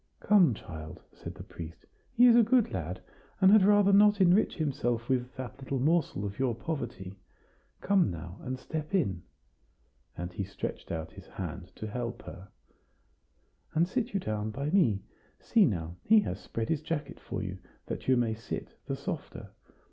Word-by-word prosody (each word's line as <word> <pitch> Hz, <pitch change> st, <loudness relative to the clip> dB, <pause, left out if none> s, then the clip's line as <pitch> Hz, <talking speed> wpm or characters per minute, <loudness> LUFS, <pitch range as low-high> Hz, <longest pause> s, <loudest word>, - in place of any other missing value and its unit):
"Come, 180 Hz, -, +5 dB
child," 80 Hz, -4 st, -9 dB
said -, -, -9 dB
the -, -, -9 dB
priest; 85 Hz, 0 st, -10 dB, 0.3 s
"he 245 Hz, -, +8 dB
is 240 Hz, -2 st, +8 dB
a 240 Hz, -, +8 dB
good 230 Hz, +1 st, +3 dB
lad, 90 Hz, +1 st, -4 dB, 0.4 s
and 190 Hz, -1 st, +6 dB
had 215 Hz, 0 st, +8 dB
rather 205 Hz, 0 st, +5 dB
not 205 Hz, +1 st, +6 dB
enrich 185 Hz, +3 st, +4 dB
himself 120 Hz, -6 st, -1 dB
with 130 Hz, 0 st, -1 dB
that 130 Hz, 0 st, -7 dB
little 135 Hz, 0 st, -3 dB
morsel 145 Hz, -, +1 dB
of 100 Hz, +3 st, -6 dB
your 130 Hz, -3 st, +1 dB
poverty. 100 Hz, -, -5 dB, 0.6 s
Come 195 Hz, -, +3 dB
now, 85 Hz, +1 st, -7 dB
and 130 Hz, +1 st, -4 dB
step 155 Hz, +6 st, -4 dB
in," 100 Hz, -, +1 dB, 1.0 s
and 90 Hz, +1 st, -5 dB
he 100 Hz, -, -3 dB
stretched 95 Hz, -, -6 dB
out 80 Hz, -1 st, -4 dB
his -, -, -13 dB
hand -, -, -6 dB
to -, -, -6 dB
help 120 Hz, +2 st, -4 dB
her, 90 Hz, +2 st, -10 dB, 1.3 s
"and 165 Hz, +2 st, +3 dB
sit 245 Hz, +3 st, -1 dB
you -, -, +3 dB
down 110 Hz, -, -2 dB
by 140 Hz, +7 st, -3 dB
me. 120 Hz, -, +3 dB, 0.4 s
See, 225 Hz, -4 st, +4 dB
now, 85 Hz, -, -2 dB
he 220 Hz, 0 st, +5 dB
has -, -, -4 dB
spread 115 Hz, 0 st, -4 dB
his 155 Hz, -2 st, 0 dB
jacket 150 Hz, -2 st, -4 dB
for -, -, -5 dB
you, 95 Hz, -1 st, -5 dB, 0.3 s
that -, -, -6 dB
you 130 Hz, -1 st, +5 dB
may 115 Hz, -2 st, +1 dB
sit 110 Hz, -, -6 dB, 0.2 s
the -, -, -1 dB
softer. -, -, -6 dB
130 Hz, 175 wpm, -30 LUFS, -, 1.3 s, he